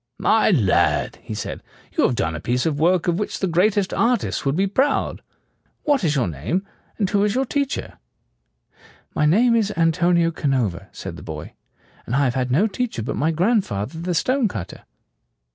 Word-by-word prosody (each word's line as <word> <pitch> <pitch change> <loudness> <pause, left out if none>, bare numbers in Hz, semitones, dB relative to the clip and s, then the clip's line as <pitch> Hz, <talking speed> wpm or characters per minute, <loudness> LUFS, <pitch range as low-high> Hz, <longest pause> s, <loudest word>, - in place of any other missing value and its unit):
"My 220 - +3
lad," 90 - +2
he - - -6
said, - - -5 0.3
"you - - +3
have 125 - +1
done 80 -6 -1
a - - -4
piece 125 +8 -1
of 150 -3 0
work 175 +2 +2
of 175 +1 +1
which 210 - -3
the - - -1
greatest 190 +3 +2
artists 240 +1 +1
would 135 +1 0
be 190 +3 +2
proud. 265 +9 0 0.6
What 290 - +2
is 155 -3 +1
your 125 -7 +1
name, 85 - -2 0.3
and 205 - +1
who 200 +1 +1
is 210 +1 +1
your 265 +1 +1
teacher?" 280 +2 -3 1.1
"My 150 - +2
name 230 +9 +4
is 215 -3 +1
Antonio 170 +1 +3
Canova," 130 - -1
said - - -7
the - - -10
boy, - - -7 0.5
"and 120 - -1
I 140 - +3
have 125 -3 +1
had 130 -1 -1
no 150 +12 +3
teacher 225 - -2
but - - -3
my 155 - +1
grandfather 165 - 0
the 175 +1 -2
stonecutter." 210 - -1
170 Hz, 180 wpm, -22 LUFS, 130-210 Hz, 1.1 s, name